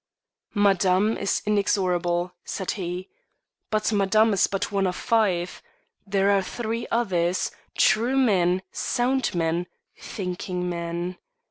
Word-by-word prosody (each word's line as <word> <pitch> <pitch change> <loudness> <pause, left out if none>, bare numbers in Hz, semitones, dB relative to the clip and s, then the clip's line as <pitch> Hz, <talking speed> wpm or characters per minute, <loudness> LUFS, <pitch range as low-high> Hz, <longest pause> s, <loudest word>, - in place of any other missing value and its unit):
"Madame 200 +1 +3
is - - -1
inexorable," 180 -4 +1
said 190 - -3
he; 180 -1 -4 0.6
"but 215 0 +1
Madame 210 +2 +3
is 195 - +3
but 195 +1 -2
one 195 -1 +1
of 180 - -2
five. 195 -7 0 0.5
There 195 0 +2
are 200 -1 +3
three 230 +3 -4
others 185 -6 0 0.3
true 230 +5 +3
men, 190 -7 +3
sound 255 -2 0
men, 170 +1 0 0.3
thinking 180 -2 -4
men. 170 +1 -3
195 Hz, 115 wpm, -25 LUFS, 180-215 Hz, 0.6 s, Madame